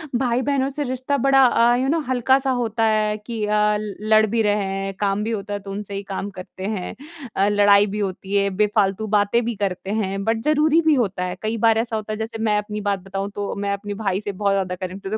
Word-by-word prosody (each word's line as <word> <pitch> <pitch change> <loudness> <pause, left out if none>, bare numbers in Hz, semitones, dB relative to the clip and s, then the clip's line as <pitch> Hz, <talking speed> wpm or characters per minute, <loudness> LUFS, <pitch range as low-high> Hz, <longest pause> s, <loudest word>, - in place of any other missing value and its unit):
भाई-बहनों 260 +2 +1
से 290 +2 -3
रिश्ता 260 +2 -2
बड़ा 270 -1 +6
अ, 240 -1 +4
यू 260 +2 0
नो 325 +3 +2
हल्का-सा 265 +2 +2
होता 225 0 -1
है 215 -1 +1
कि 215 0 -5
अ, 210 0 +2
लड़ 215 +1 +2
भी 225 +2 0
रहे 210 -1 +1
हैं, 195 0 -3
काम 200 0 0
भी 225 - -2
होता 205 -1 -4
है 205 - -2
तो 195 0 -9
उनसे 200 0 -6
ही 200 - -4
काम 200 +1 -3
करते 185 +1 -8
हैं 180 -3 -5 0.4
अ, 195 +1 +3
लड़ाई 205 0 +5
भी 210 - -2
होती 195 0 -3
है, 200 0 +3
बेफ़ालतू 205 +1 +1
बातें 205 +4 +2
भी 235 -1 -2
करते 195 -1 -3
हैं, 195 0 -3
बट 225 +1 0
ज़रूरी 305 +2 +3
भी 315 -1 +3
होता 195 -7 0
है। 180 0 -3
कई 220 +1 -2
बार 225 0 +3
ऐसा 230 0 -1
होता 215 0 -3
है 215 - -4
जैसे 225 0 -5
मैं 210 - +3
अपनी 210 0 -4
बात 200 -1 0
बताऊँ 195 +2 -5
तो, 205 -1 -3
मैं 200 0 -2
अपने 205 +1 -5
भाई 190 +1 0
से 205 - -4
बहुत 200 +1 0
ज़्यादा 185 -2 -1
कनेक्टेड 190 +2 -6
हूँ 220 - 0
210 Hz, 235 wpm, -22 LUFS, 200-230 Hz, 0.4 s, बड़ा